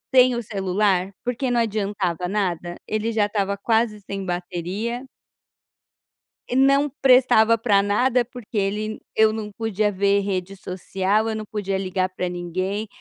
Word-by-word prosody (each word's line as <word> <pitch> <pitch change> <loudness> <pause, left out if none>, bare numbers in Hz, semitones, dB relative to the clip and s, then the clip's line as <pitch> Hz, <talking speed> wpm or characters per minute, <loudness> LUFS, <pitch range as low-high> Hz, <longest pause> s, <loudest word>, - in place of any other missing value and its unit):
sem 255 -1 +6
o 235 - -2
celular, 195 -2 0
porque 245 +1 -1
não 240 - +2
adiantava 200 -5 -1
nada, 180 -4 -2
ele 215 +1 -1
já 215 -2 +2
estava 200 -1 -1
quase 220 0 +1
sem 195 0 -5
bateria 180 +7 -3 1.4
e - - -3
não 275 +2 +4
prestava 250 -3 +5
pra 210 -4 +3
nada, 240 +5 +2
porque 240 -2 -8
ele 210 +2 -1
eu 220 0 +4
não 215 -1 -5
podia 215 -1 -1
ver 200 +1 +2
rede 195 -1 -3
social, 190 +3 -1
eu 220 - -2
não 215 -1 -5
podia 200 -2 -2
ligar 185 -1 -1
pra 185 -1 -3
ninguém, 185 +4 -3
205 Hz, 150 wpm, -23 LUFS, 190-225 Hz, 1.4 s, sem